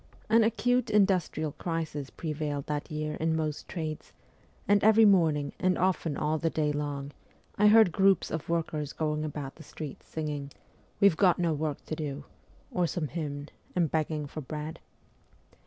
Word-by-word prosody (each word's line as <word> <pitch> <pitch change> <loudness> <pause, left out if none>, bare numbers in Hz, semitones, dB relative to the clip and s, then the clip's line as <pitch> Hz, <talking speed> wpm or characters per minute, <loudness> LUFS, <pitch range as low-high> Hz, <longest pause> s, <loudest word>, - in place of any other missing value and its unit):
An 225 +1 +6
acute 235 +2 +1
industrial 185 -7 +2
crisis 155 -4 -4
prevailed 150 -3 -3
that 150 -1 -3
year 155 0 -3
in 160 0 +1
most 155 -2 -3
trades, 155 -3 -5 0.5
and 205 0 +4
every 220 +1 +7
morning, 160 -8 +3
and 185 -1 +2
often 170 -5 0
all 155 +1 0
the 165 - +1
day 150 -2 0
long, 145 -1 -3 0.4
I 210 - +5
heard 215 -3 +7
groups 195 +2 +3
of 160 0 -4
workers 155 -3 -1
going 155 -1 -1
about 145 -3 -4
in - - -36
the 160 - -11
streets 150 -1 -8
singing 150 -3 -4 0.2
' - - -34
We've 200 -6 +5
got 185 -3 +4
no 170 -2 +1
work 150 -1 -3
to 155 - -3
do,' 145 -2 -4 0.5
or 180 -1 +1
some 160 -3 -3
hymn, 145 -3 -4 0.3
and 170 -5 +2
begging 155 -1 -1
for 155 +2 -7
bread. 150 +4 -6
155 Hz, 170 wpm, -29 LUFS, 150-180 Hz, 0.5 s, every